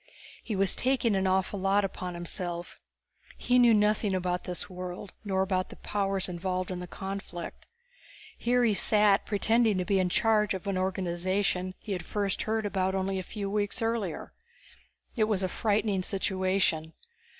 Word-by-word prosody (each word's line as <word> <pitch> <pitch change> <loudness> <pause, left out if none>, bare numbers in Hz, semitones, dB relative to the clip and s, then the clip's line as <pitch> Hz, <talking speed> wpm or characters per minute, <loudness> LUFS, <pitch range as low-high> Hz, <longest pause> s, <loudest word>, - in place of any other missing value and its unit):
He 220 - -3
was 195 -1 +2
taking 250 -4 +2
an 190 0 +1
awful 190 +1 +1
lot 195 +1 +3
upon 180 -2 -5
himself. 175 0 -4 0.6
He 250 0 +3
knew 240 -1 +7
nothing 210 -1 +2
about 180 -1 -1
this 180 -1 -4
world, 180 +1 -7
nor 190 -2 +1
about 185 -1 -1
the - - -10
powers 195 -2 -1
involved 185 +1 -2
in 180 - -3
the 180 - -6
conflict. 190 -2 -6 0.7
Here 245 +1 +2
he 225 -3 +4
sat 210 0 +3
pretending 220 0 +2
to 180 - -1
be 195 -1 +2
in 185 -1 +2
charge 210 0 +2
of 190 - -7
an 200 -1 -1
organization 185 0 -1
he 215 - -8
had 180 -3 -2
first 200 -1 -1
heard 220 -1 -1
about 190 -2 0
only 190 0 -1
a - - -2
few 200 +2 -5
weeks 205 0 -1
earlier. 225 -5 -2 0.8
It 220 -4 +3
was 210 -3 0
a - - +2
frightening 205 0 +1
situation. 185 -4 0
195 Hz, 165 wpm, -29 LUFS, 185-210 Hz, 0.8 s, knew